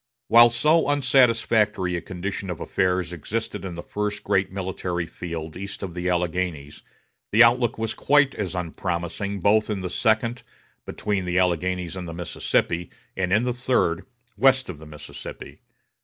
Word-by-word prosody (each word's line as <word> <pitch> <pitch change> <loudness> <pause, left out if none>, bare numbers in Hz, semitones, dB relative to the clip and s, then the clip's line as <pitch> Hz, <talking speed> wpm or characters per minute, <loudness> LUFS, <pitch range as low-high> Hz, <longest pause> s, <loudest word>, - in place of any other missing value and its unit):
While 120 +1 +8
so 150 +8 +3
unsatisfactory 115 -8 +3
a 85 - -2
condition 95 +3 -5
of 90 - -4
affairs 90 -2 0
existed 110 +7 -4
in 90 -3 -5
the 85 - -7
first 105 +1 -3
great 95 0 +1
military 90 -2 -3
field 80 -1 -6
east 100 +2 -7
of 95 -3 -5
the 90 +1 -2
Alleghanies, 85 -4 -2 0.5
the 115 +4 +7
outlook 120 0 +3
was 110 0 -2
quite 145 -1 +3
as 95 -3 -4
unpromising 90 +3 -3
both 105 +4 +3
in 105 -3 -2
the 90 -1 -4
second 115 +3 +1 0.4
between 100 -3 -2
the 90 0 -1
Alleghanies 90 0 0
and 90 -2 -6
the 85 - -6
Mississippi 85 0 -1 0.3
and 90 -1 -1
in 105 +4 +4
the 125 0 0
third 125 -9 +1 0.3
west 130 +2 +3
of 80 - -12
the 80 - -12
Mississippi. 75 -1 -10
95 Hz, 155 wpm, -24 LUFS, 90-115 Hz, 0.5 s, While